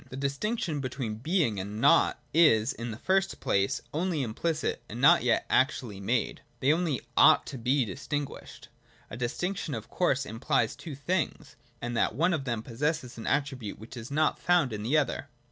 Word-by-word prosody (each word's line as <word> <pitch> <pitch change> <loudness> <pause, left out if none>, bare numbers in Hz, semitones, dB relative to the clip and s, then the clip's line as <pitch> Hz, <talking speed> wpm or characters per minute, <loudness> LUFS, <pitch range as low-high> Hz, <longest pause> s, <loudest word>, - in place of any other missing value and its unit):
The 130 - -7
distinction 150 - -2
between 125 -5 -4
Being 145 - 0
and 100 +3 -5
Nought - - +4
is, 145 -8 +5
in 115 +1 -6
the 110 - -6
first 190 +8 0
place, 100 0 0
only 165 -2 0
implicit, 150 +5 -2
and 115 - -6
not 135 - +6
yet 120 -1 +1
actually 125 -6 +1
made: 110 +4 -1 0.2
they 140 +3 +4
only 160 -6 -1
ought - - +6
to 135 - -7
be 130 +2 +2
distinguished. 140 +6 -6 0.4
A - - -5
distinction 150 +6 -3
of 110 - -7
course 140 -7 +1
implies 115 +4 0
two 155 -5 -8
things, 155 +3 -2 0.3
and 120 0 -3
that 110 - +1
one 175 +7 +2
of 145 -5 -2
them 115 -4 -2
possesses 130 0 -2
an 115 - -6
attribute 135 -7 -1
which 110 +5 -11
is 120 -1 -7
not 155 +2 +1
found 170 -9 +2
in 105 - -4
the 125 +9 +2
other. 145 -5 -1
135 Hz, 180 wpm, -28 LUFS, 115-155 Hz, 0.4 s, not